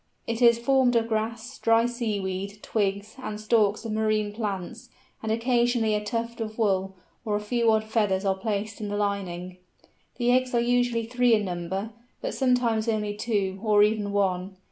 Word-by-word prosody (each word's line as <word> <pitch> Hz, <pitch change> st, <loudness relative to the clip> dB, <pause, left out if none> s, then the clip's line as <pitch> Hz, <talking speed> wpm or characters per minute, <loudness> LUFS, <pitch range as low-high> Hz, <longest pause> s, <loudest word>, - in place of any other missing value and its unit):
It 230 Hz, +1 st, -3 dB
is 235 Hz, -1 st, +6 dB
formed 250 Hz, 0 st, +3 dB
of 230 Hz, -1 st, +2 dB
grass, 230 Hz, +3 st, -3 dB
dry 230 Hz, 0 st, +4 dB
sea 235 Hz, -4 st, -2 dB
weed, 195 Hz, +2 st, -5 dB
twigs, 200 Hz, +2 st, -2 dB
and 210 Hz, -4 st, -5 dB
stalks 215 Hz, 0 st, +2 dB
of 225 Hz, -, -3 dB
marine 215 Hz, -1 st, 0 dB
plants, 215 Hz, +3 st, -5 dB, 0.3 s
and 220 Hz, -, -2 dB
occasionally 235 Hz, -1 st, +2 dB
a 210 Hz, 0 st, 0 dB
tuft 230 Hz, +2 st, -3 dB
of 215 Hz, -1 st, -5 dB
wool 195 Hz, -3 st, 0 dB, 0.3 s
or 215 Hz, -3 st, -1 dB
a -, -, +1 dB
few 230 Hz, +2 st, +1 dB
odd 220 Hz, 0 st, +2 dB
feathers 210 Hz, -3 st, 0 dB
are 195 Hz, -, +3 dB
placed 205 Hz, +2 st, -3 dB
in 210 Hz, -, -3 dB
the 205 Hz, 0 st, -2 dB
lining. 185 Hz, -3 st, -3 dB, 0.6 s
The 245 Hz, 0 st, +2 dB
eggs 255 Hz, 0 st, +2 dB
are -, -, +4 dB
usually 240 Hz, -1 st, +1 dB
three 245 Hz, 0 st, +3 dB
in 210 Hz, -1 st, 0 dB
number, 185 Hz, +4 st, -4 dB, 0.3 s
but -, -, -4 dB
sometimes 245 Hz, -4 st, +1 dB
only 210 Hz, -2 st, 0 dB
two, 205 Hz, -3 st, -1 dB
or 210 Hz, -2 st, +4 dB
even 210 Hz, -1 st, +1 dB
one. 190 Hz, -1 st, -1 dB
215 Hz, 180 wpm, -26 LUFS, 200-235 Hz, 0.6 s, is